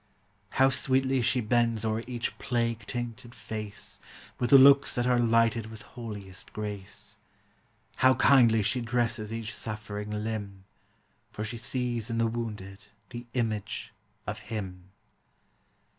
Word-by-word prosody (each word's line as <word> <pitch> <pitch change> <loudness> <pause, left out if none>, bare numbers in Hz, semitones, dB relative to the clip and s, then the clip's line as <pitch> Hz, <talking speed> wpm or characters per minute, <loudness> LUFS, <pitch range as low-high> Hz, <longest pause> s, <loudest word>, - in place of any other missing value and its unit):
How 135 0 +6
sweetly 130 0 +2
she 125 +2 +2
bends 115 0 +1
o'er 110 0 0
each 120 -2 -3
plague 115 -3 -1
tainted 120 0 -5
face, 105 -2 -6 0.4
With 120 - 0
looks 140 0 +8
that 120 - +1
are 125 -1 +3
lighted 115 -1 +3
with 110 -1 -10
holiest 105 -6 -8
grace; 105 -2 -6 0.8
How 130 0 +5
kindly 120 -5 +5
she 120 +4 +1
dresses 115 -2 -1
each 115 -1 -4
suffering 105 -1 -5
limb, 105 -2 -4 0.7
For 105 - -5
she 115 +2 -4
sees 120 -2 -1
in 115 - -2
the 115 - +3
wounded 105 -4 -5 0.2
the 120 0 -8
image 110 -4 -2 0.3
of - - -4
Him. 95 -5 -5
115 Hz, 130 wpm, -29 LUFS, 105-120 Hz, 0.8 s, looks